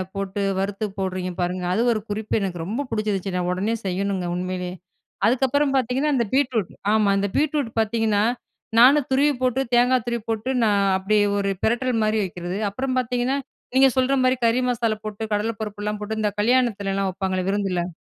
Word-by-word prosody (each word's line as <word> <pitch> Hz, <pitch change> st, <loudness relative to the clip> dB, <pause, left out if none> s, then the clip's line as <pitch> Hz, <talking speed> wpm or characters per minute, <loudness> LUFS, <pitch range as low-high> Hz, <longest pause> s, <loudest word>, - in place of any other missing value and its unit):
போட்டு 195 Hz, 0 st, -3 dB, 0.2 s
வறுத்து 200 Hz, +2 st, -2 dB
போடுறீங்க 185 Hz, -1 st, -2 dB
பாருங்க! 180 Hz, +1 st, -2 dB
அது 220 Hz, -, +1 dB
ஒரு 220 Hz, -, 0 dB
குறிப்பு 210 Hz, +1 st, -4 dB
எனக்கு 185 Hz, -3 st, -3 dB
ரொம்ப 230 Hz, +10 st, -2 dB
புடிச்சிருச்சு. 205 Hz, -4 st, -2 dB
நான் 180 Hz, 0 st, -1 dB
உடனே 200 Hz, +5 st, -1 dB
செய்யணுங்க 190 Hz, -1 st, -1 dB
உண்மையிலேயே! 180 Hz, 0 st, -3 dB, 0.5 s
அதுக்கப்பறம் 270 Hz, +3 st, +2 dB
பார்த்தீங்கன்னா, 265 Hz, +3 st, +1 dB
அந்த 235 Hz, -3 st, +1 dB
பீட்ரூட் 255 Hz, -8 st, +1 dB, 0.2 s
ஆமா. 215 Hz, -2 st, +3 dB
அந்த 200 Hz, +1 st, +1 dB
பீட்ரூட் 290 Hz, -5 st, 0 dB
பார்த்தீங்கன்னா, 220 Hz, -1 st, +1 dB, 0.6 s
நானும் 270 Hz, +3 st, +6 dB
துருவி 285 Hz, +3 st, +4 dB
போட்டு 255 Hz, +1 st, +2 dB
தேங்கா 250 Hz, +2 st, +4 dB
துருவி 235 Hz, -1 st, -1 dB
போட்டு, 225 Hz, +3 st, -2 dB
நான் 205 Hz, -2 st, +3 dB
அப்பிடியே 205 Hz, +2 st, +2 dB, 0.2 s
ஒரு 200 Hz, 0 st, 0 dB
பிரட்டல்மாரி 225 Hz, -2 st, +1 dB
வைக்கிறது. 175 Hz, 0 st, -5 dB
அப்புறம் 255 Hz, +4 st, -2 dB
பார்த்தீங்கன்னா, 250 Hz, +2 st, 0 dB, 0.4 s
நீங்க 270 Hz, +1 st, +7 dB
சொல்றமாரி 260 Hz, 0 st, +3 dB
கறி 230 Hz, +2 st, +3 dB
மசாலா 230 Hz, -3 st, 0 dB
போட்டு 215 Hz, 0 st, -5 dB
கடல 210 Hz, +2 st, 0 dB
பருப்புலாம் 210 Hz, 0 st, -4 dB
போட்டு 220 Hz, +1 st, -3 dB
இந்த 210 Hz, -1 st, +1 dB
கல்யாணத்துலலாம் 205 Hz, -5 st, +1 dB
வப்பாங்களே! 185 Hz, -1 st, -2 dB
விருந்தில. 185 Hz, -3 st, -1 dB
215 Hz, 155 wpm, -23 LUFS, 195-250 Hz, 0.6 s, நீங்க